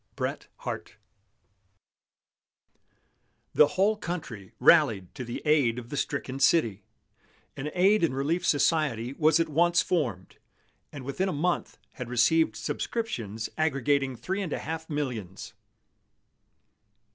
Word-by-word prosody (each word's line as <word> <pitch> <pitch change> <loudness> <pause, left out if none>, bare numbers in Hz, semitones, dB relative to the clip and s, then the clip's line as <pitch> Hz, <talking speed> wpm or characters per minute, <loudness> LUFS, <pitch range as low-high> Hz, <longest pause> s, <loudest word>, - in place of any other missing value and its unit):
BRET - - -3
HARTE. - - -6 2.6
The 150 - +6
whole 205 +3 +3
country 155 - -6
rallied 105 - +4
to 130 - -6
the 120 0 -6
aid 140 -6 +3
of 120 -1 -7
the - - -5
stricken 135 -2 -3
city. 115 - +3 0.7
An 145 +3 -4
Aid 195 +2 +4
and 150 -6 +1
Relief 155 +6 0
Society 145 -6 +1
was 155 +2 +3
at 165 - +2
once 170 +3 +3
formed, 120 - -2 0.5
and 140 -3 -8
within 185 +8 -1
a - - -1
month 175 +3 -1
had 125 -2 -7
received 160 +7 +3
subscriptions 115 - -3
aggregating 140 -3 +1
three 190 - -3
and 175 -6 -3
a - - -1
half 160 +2 -5
millions. 110 - -4
145 Hz, 120 wpm, -27 LUFS, 120-165 Hz, 2.6 s, The